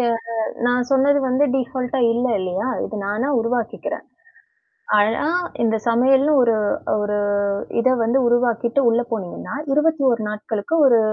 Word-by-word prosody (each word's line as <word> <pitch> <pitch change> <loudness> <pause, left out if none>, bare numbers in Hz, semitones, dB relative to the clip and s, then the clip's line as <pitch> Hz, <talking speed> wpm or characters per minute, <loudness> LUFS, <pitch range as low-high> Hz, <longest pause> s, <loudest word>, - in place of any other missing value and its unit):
ய - - +2 0.6
நான் 245 0 0
சொன்னது 280 +2 +3
வந்து 260 +3 +2
டீஃபால்டா 255 0 -2
இல்ல 245 +2 0
இல்லையா? 185 +3 -3 0.2
இது 215 - -7
நானா 215 +7 -1
உருவாக்கிக்கிறேன். 230 0 -3 0.9
ஆனா 220 +8 +1 0.3
இந்த 225 -1 +2
சமையல்ன்னு 265 +5 +3
ஒரு 230 -2 +3 0.5
ஒரு 210 0 -1 0.6
இத 255 - +3
வந்து 235 +4 +1
உருவாக்கிட்டு 240 +1 +1
உள்ள 230 +1 +2
போனீங்கன்னா, 205 +3 -5 0.2
21 285 -6 +2
நாட்களுக்கு 210 +5 -3
ஒரு 235 -3 +5
240 Hz, 125 wpm, -20 LUFS, 225-265 Hz, 0.9 s, ஒரு